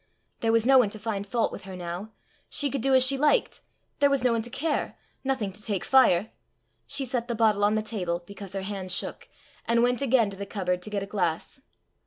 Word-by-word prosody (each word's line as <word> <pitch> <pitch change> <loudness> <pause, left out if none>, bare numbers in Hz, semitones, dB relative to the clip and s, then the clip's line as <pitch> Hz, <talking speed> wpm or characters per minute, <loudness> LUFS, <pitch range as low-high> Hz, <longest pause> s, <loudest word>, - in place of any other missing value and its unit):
There 225 - +1
was 230 0 +3
no 265 0 +7
one 230 -5 +3
to 215 - -8
find 210 -2 -4
fault 230 +2 0
with - - -8
her 190 -1 -8
now! 180 +4 -6 0.4
She 285 -2 -1
could 275 - -2
do 270 +2 +3
as 260 -1 +7
she 270 +1 +3
liked 300 - +2 0.4
there 285 - +5
was 275 -2 +1
no 250 - +3
one 230 -1 +1
to 235 - -7
care! 295 +4 -2 0.3
nothing 260 -7 -1
to 205 - -12
take 205 -3 -3
fire! 220 -7 +4 0.6
She 280 -1 -2
set 245 -1 -2
the 235 - -2
bottle 215 -2 +3
on 210 +1 +3
the 215 - 0
table, 180 -5 -3
because 200 0 -9
her 195 -1 -3
hand 190 -2 -4
shook, - - -2 0.4
and 235 0 +3
went 245 +1 +1
again 240 -6 +3
to 195 - -10
the 200 0 -6
cupboard 180 -3 -2
to 215 - -6
get 200 -2 -2
a - - -4
glass. 185 +4 -2
220 Hz, 235 wpm, -27 LUFS, 195-255 Hz, 0.6 s, no